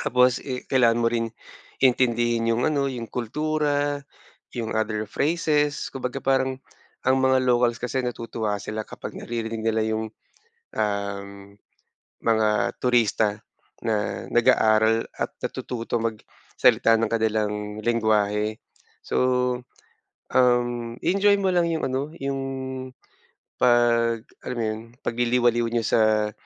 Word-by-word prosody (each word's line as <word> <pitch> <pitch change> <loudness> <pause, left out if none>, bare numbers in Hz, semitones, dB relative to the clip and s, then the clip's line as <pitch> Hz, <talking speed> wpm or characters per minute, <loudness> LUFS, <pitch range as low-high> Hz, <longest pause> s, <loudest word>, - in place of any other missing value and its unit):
Tapos 125 0 +3
i 130 -2 -4
kailangan 120 -3 +4
mo 115 - +2
ring 115 -1 -1 0.5
intindihin 120 -2 +2
yung 120 +2 0
ano, 140 -2 +1
yung 120 -4 -5
kultura, 145 +3 -1 0.5
yung 115 -2 -3
other 110 -1 -1
phrases. 150 -1 0
Kumbaga, 135 0 -4
parang 130 -1 +1 0.4
ang 130 +1 +4
mga 130 0 +3
locals 120 -1 +2
kasi 125 +1 -2
natutuwa 115 -4 -3
sila 110 0 -4
kapag - - -8
naririnig 115 -1 -4
nila 110 0 +1
yung, 110 0 -2 0.7
uhm, 100 -1 -3 0.6
mga 110 -2 +1
turista 110 -4 +2 0.4
na 105 -3 -1
nag-aaral 110 -1 +3
at - - -3
natututo 120 -1 -3
magsalita 115 0 +1
ng 115 - +1
kanilang 110 -2 +1 0.3
lengguwahe. 110 -2 +1 0.5
So, - - -2 1.1
uhm, 120 -2 +1
i-enjoy 200 +1 +3
mo 190 - +2
lang 175 -2 +3
yung 160 - -2
ano, 140 +4 -2
yung 135 0 -2 1.2
'pag, 115 -1 +3 0.2
alam 125 - -5
mo 115 - -1
yun, 110 0 -2 0.2
pagliliwaliw 120 0 +2
niyo 115 -1 0
sa 110 -1 +2
115 Hz, 115 wpm, -24 LUFS, 110-130 Hz, 1.2 s, kailangan